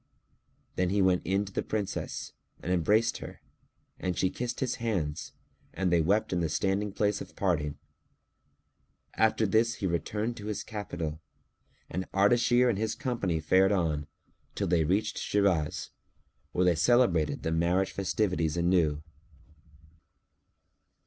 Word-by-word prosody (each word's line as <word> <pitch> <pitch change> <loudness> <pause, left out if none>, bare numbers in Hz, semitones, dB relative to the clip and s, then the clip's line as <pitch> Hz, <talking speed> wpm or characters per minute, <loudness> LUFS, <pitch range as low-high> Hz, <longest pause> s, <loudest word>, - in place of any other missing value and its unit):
Then 90 -1 +2
he 100 +2 +1
went 95 -2 +3
in 100 +2 +1
to 100 - -10
the - - 0
Princess 105 -3 -4 0.3
and 90 - -2
embraced 105 +7 +2
her; - - -9 0.6
and 90 -2 -2
she 95 - +1
kissed 120 0 -4
his 125 -2 -1
hands 90 -10 -2 0.4
and 95 -2 0
they 85 -1 +4
wept 100 +5 +1
in 90 - +1
the 85 -2 0
standing 100 +5 0
place 105 0 0
of - - -10
parting. 75 -7 0 1.4
After 110 0 +2
this 115 +3 +2
he 100 - -4
returned 105 +7 -2
to 105 -1 -7
his 105 - -3
capital 85 -7 -5 0.7
and 95 +2 -5
Ardashir 120 +5 +4
and 110 -5 +1
his 110 0 -1
company 115 - -1
fared 95 +5 +4
on, 80 -6 0 0.5
till - - -1
they 85 -2 +2
reached 105 +6 0
Shiraz, 95 -7 0 0.6
where 90 - +1
they 90 - +5
celebrated 85 -4 +2
the 80 - -1
marriage 85 +4 +1
festivities 90 -5 0
anew. 85 -4 +2
95 Hz, 140 wpm, -29 LUFS, 85-105 Hz, 1.4 s, they